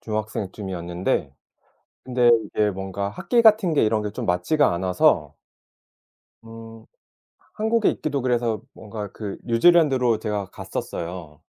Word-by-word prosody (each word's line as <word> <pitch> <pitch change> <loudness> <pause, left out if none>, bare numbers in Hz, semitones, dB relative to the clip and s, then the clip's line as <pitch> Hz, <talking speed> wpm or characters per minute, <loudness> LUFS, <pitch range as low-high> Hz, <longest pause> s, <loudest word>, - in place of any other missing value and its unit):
중학생 110 -2 -3
쯤이었는데. 90 -7 -3 0.7
근데 125 -2 +3
이게 105 -1 0
뭔가 95 +1 -4
학기 235 - +1
같은 215 -6 +5
게 140 - +3
이런 110 0 +1
게 105 - -3
좀 - - -5
맞지가 145 - +2
않아서 90 +1 +1 1.1
음 115 0 -12 0.7
한국에 220 +1 +1
있기도 145 -3 -2
그래서 120 -3 0
뭔가 105 -2 -8
그 105 -3 -6
뉴질랜드로 125 -3 +3
제가 105 -2 -3
갔었어요. 85 -3 -6
110 Hz, 275 characters per minute, -23 LUFS, 95-130 Hz, 1.1 s, 같은